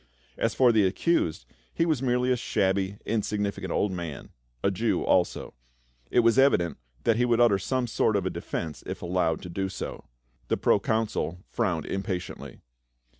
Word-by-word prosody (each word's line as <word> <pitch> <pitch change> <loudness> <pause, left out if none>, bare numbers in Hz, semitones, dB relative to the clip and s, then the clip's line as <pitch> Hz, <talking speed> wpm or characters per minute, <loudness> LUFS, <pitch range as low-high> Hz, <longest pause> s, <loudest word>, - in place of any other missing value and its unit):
As - - -1
for 125 -2 +5
the 105 -4 +4
accused, 90 - 0 0.3
he 165 - +1
was 155 -6 +1
merely 125 -1 +1
a - - +4
shabby 95 -3 0
insignificant 105 -2 -2
old 100 - +1
man 85 -5 -6 0.2
— - - -41
a 100 - +3
Jew 110 +4 0
also. 90 -2 +1 0.6
It 120 - +4
was 115 +2 +4
evident 135 -11 +3 0.2
that 115 -1 +3
he 125 - +3
would 120 -1 +2
utter 115 -5 +5
some 130 +6 -1
sort 110 -2 +1
of 100 -2 0
a 95 - 0
defence 80 -3 -5
if - - -5
allowed 85 -2 0
to 90 - -7
do 95 +2 -2
so. - - -6 0.4
The - - +1
proconsul 105 -4 0
frowned 90 -10 0
impatiently. 95 -2 -5
100 Hz, 170 wpm, -27 LUFS, 90-120 Hz, 0.6 s, for